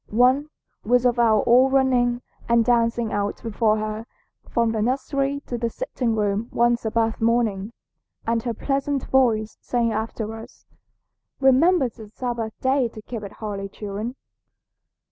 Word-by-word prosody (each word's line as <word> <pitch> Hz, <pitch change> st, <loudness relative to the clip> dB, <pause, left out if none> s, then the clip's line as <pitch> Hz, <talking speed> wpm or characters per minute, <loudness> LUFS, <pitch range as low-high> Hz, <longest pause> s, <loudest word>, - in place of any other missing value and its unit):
One 255 Hz, +6 st, +3 dB, 0.3 s
was 245 Hz, +3 st, +2 dB
of 245 Hz, -1 st, +2 dB
our 225 Hz, -2 st, +4 dB
all 255 Hz, +3 st, +5 dB
running 250 Hz, -2 st, +2 dB, 0.3 s
and 235 Hz, -1 st, +4 dB
dancing 230 Hz, -1 st, +1 dB
out 205 Hz, 0 st, -1 dB
before 220 Hz, -1 st, +1 dB
her 215 Hz, +1 st, -4 dB, 0.4 s
from 235 Hz, -1 st, +1 dB
the 220 Hz, -1 st, -1 dB
nursery 275 Hz, +3 st, -1 dB
to 240 Hz, -, -4 dB
the 235 Hz, 0 st, 0 dB
sitting 245 Hz, -, -2 dB
room 210 Hz, +1 st, 0 dB
one 240 Hz, 0 st, +3 dB
Sabbath 225 Hz, -1 st, -1 dB
morning, 225 Hz, -3 st, +1 dB, 0.5 s
and 230 Hz, 0 st, +1 dB
her 235 Hz, 0 st, -2 dB
pleasant 275 Hz, +2 st, -1 dB
voice 225 Hz, -5 st, +1 dB
saying 235 Hz, -2 st, 0 dB
after 220 Hz, 0 st, -3 dB
us, 225 Hz, 0 st, -12 dB, 0.7 s
'Remember 275 Hz, +3 st, +4 dB
the 220 Hz, -2 st, -11 dB
Sabbath 235 Hz, -1 st, -4 dB
day 260 Hz, -1 st, +2 dB
to 220 Hz, -1 st, -11 dB
keep 230 Hz, -1 st, -6 dB
it 200 Hz, -, -8 dB
holy, 200 Hz, -2 st, -5 dB
children.' 210 Hz, +4 st, -5 dB
235 Hz, 145 wpm, -23 LUFS, 220-255 Hz, 0.7 s, all